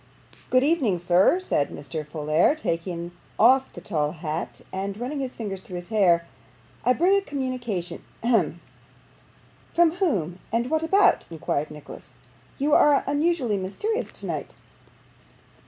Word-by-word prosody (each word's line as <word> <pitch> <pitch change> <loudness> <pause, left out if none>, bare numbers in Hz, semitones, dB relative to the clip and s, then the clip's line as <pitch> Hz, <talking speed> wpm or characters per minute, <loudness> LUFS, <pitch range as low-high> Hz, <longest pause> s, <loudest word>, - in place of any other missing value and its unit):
'Good 255 0 +4
evening, 275 - +2
sir,' 175 - +4
said 255 - 0
Mr. 150 +2 -6
Folair, 155 - +2
taking 170 - -3 0.3
off 260 +4 +5
the - - -10
tall 150 -5 -1
hat, 160 0 -5
and 195 +1 -3
running 265 +4 -3
his 260 -2 -4
fingers 195 -4 -5
through 185 - -9
his 175 0 -7
hair. 180 -6 +3 0.6
'I 250 - +4
bring 360 +8 +3
a - - +1
communication. 255 - -4 0.2
Hem!' 185 -9 +1 1.1
'From 340 -1 +5
whom 190 - 0
and 235 +4 0
what 315 0 +2
about?' 385 +5 +3
inquired 155 -2 -2
Nicholas. 150 -3 -12 0.4
'You 290 +2 +1
are 290 -2 +5
unusually 290 -6 +1
mysterious 415 - -3
tonight. - - -6
210 Hz, 135 wpm, -25 LUFS, 170-285 Hz, 1.1 s, off